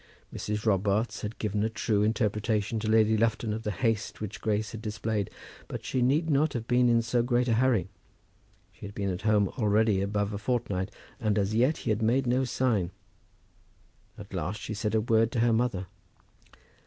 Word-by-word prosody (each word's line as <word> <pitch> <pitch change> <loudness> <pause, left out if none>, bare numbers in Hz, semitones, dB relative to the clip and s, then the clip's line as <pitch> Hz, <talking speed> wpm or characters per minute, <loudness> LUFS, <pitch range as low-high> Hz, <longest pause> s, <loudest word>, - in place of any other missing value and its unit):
Mrs. 105 +1 -3
Robarts 105 +2 +1
had 105 +1 -5
given 105 -1 -1
a 110 - +1
true 110 -2 0
interpretation 105 0 0
to 110 0 -2
Lady 110 0 +4
Lufton 110 0 +1
of 110 - -4
the 105 - -3
haste 115 -1 -1
which 105 -1 -6
Grace 105 -1 -1
had 115 - -7
displayed. 105 -1 -2 0.4
But - - -6
she 130 - -1
need 145 +7 +2
not 150 0 +2
have 115 -2 -3
been 125 0 +4
in 115 -1 +3
so 120 +1 +1
great 120 +1 +1
a 115 - +2
hurry. 115 -6 +2 0.8
She 100 - -10
had 100 - -11
been 100 -2 -1
at 90 - -4
home 105 -2 +3
already 105 -2 +3
above 100 +1 -1
a 100 - -3
fortnight, 105 -4 -1 0.3
and 105 -2 0
as 100 +1 +1
yet 125 +8 +3
he 115 - +1
had 110 +1 0
made 125 +5 +2
no 125 +2 +2
sign. 115 -8 0 1.3
At 100 -1 -11
last 95 +4 -3
she 110 - -5
said 105 0 -1
a 110 - +3
word 115 0 +2
to 115 - +1
her 120 -1 +3
mother. 110 -5 0
110 Hz, 190 wpm, -28 LUFS, 105-120 Hz, 1.3 s, Lady